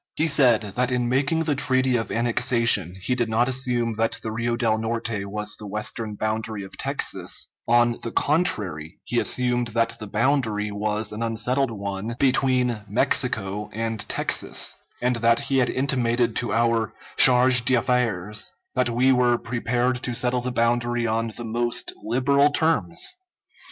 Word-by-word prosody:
He 155 - +1
said 130 -7 +4
that 120 +5 -2
in 125 -1 0
making 140 +6 +1
the 155 -2 0
treaty 130 -2 +1
of 115 -1 -2
annexation 115 -6 +2
he 105 +7 -2
did 120 -2 -1
not 115 +2 +2
assume 125 -3 0
that 115 0 0
the 110 - -3
Rio 115 +1 -1
del 115 -2 +1
Norte 110 -2 -3
was 105 +1 -4
the 105 - -9
western 105 +1 -4
boundary 110 0 -3
of 95 - -11
Texas; - - -2 0.2
on 120 0 +3
the 115 - -4
contrary, 100 - 0
he 120 - -1
assumed 125 -1 +1
that 115 0 0
the 110 - -7
boundary 110 -2 0
was 105 +1 -2
an 105 +2 -6
unsettled 115 +4 0
one 100 +1 -5
between 125 -4 +1
Mexico 105 -2 -1
and 115 0 -3
Texas; - - 0 0.3
and 125 -1 +1
that 115 0 +3
he 135 -1 0
had 125 - +2
intimated 120 -4 0
to 120 - -2
our 115 -2 +1 0.2
charge 125 -1 +6
d'affaires 115 -5 0 0.2
that 125 -1 +1
we 125 +3 +3
were 125 -2 +3
prepared 120 +1 -1
to 120 -2 -3
settle 125 +1 0
the 125 +1 -3
boundary 120 0 0
on 115 0 -1
the 120 - -6
most 120 +1 -2
liberal 140 +5 +3
terms! 145 - 0
120 Hz, 155 wpm, -24 LUFS, 110-125 Hz, 0.3 s, charge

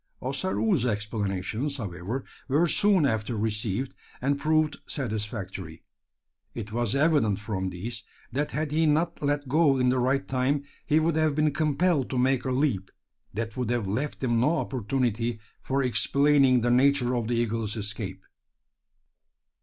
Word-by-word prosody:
Ossaroo's 150 - 0
explanations, 105 +4 -2
however, 105 +3 -4 0.2
were 150 +5 +3
soon 195 -2 +4
after 110 -2 -1
received; 110 +3 -2 0.3
and 140 +2 0
proved 155 0 +1
satisfactory. 105 - -4 0.7
It 110 -2 -6
was 120 0 0
evident 140 - +3
from 95 -3 -3
these, 110 +6 -6 0.3
that 145 +4 -1
had 150 0 -2
he 160 +1 +2
not 165 +3 +1
let 145 -1 0
go 145 0 +4
in 125 -1 +3
the 130 0 +2
right 135 +3 +1
time, 135 +2 0 0.2
he 155 0 +4
would 160 0 +1
have 155 -2 +2
been 155 0 +2
compelled 155 -1 +1
to 130 - -2
make 130 +1 +2
a 130 - 0
leap, 125 -8 0 0.5
that 110 0 -3
would 125 -3 -2
have 120 -3 0
left 130 +10 -3
him 120 -2 +2
no 150 +8 +3
opportunity 120 -2 -1 0.2
for 135 +1 0
explaining 135 0 +4
the 120 +1 +2
nature 130 0 +3
of 115 -2 -1
the 120 - 0
eagle's 115 -2 -1
escape. 100 -3 -4
125 Hz, 150 wpm, -27 LUFS, 110-145 Hz, 0.7 s, soon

